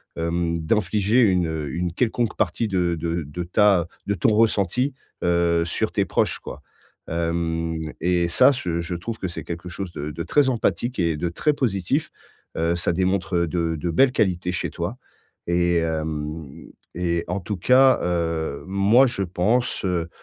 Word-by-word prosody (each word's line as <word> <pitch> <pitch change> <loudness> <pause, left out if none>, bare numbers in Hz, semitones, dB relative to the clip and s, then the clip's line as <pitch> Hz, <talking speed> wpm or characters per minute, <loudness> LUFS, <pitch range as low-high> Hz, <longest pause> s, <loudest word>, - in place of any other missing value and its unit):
hem, 85 0 -1
d'infliger 105 +6 +2
une, 90 -6 +3
heu, 80 -2 -3
une 85 +1 -2
quelconque 120 +1 0
partie 115 - 0
de 90 -4 0
de 85 +1 -2
de 80 +5 -5
ta 90 -1 +3 0.2
de 100 - +1
ton 95 - +2
ressenti, 115 +4 +2 0.3
heu, 85 -1 +2
sur 85 - -1
tes - - +1
proches, - - 0
quoi. 75 - -9 0.5
Hem, 80 0 -1 0.2
et 85 0 +2
ça, 85 - +5
ce 85 -9 -2
je 85 +1 -4
trouve 110 +6 -5
que 95 - -2
c'est 85 - -6
quelque 85 +1 -6
chose 90 0 -6
de 75 -2 -5
de 80 +3 -5
très 145 - +3
empathique 120 0 -1
et 85 -3 +1
de 85 +3 -2
très 150 - +1
positif. 130 - -1 0.5
Heu, 85 +1 +1
ça 85 0 0
démontre 95 0 0
de 85 0 -1
de 85 +3 -3
belles 130 +10 +4
qualités 90 -6 0
chez 90 - -3
toi. 90 +8 -4 0.5
Et, 85 0 +2
hem, 80 -2 -3 0.4
et 85 -1 -1
en 90 +2 -1
tout 100 +3 -4
cas, 130 +7 +5
heu, 85 -4 -1
moi 100 +7 +4
je 120 -5 -3
pense, 100 +6 0
heu, 85 -3 -1
85 Hz, 170 wpm, -23 LUFS, 85-100 Hz, 0.5 s, ça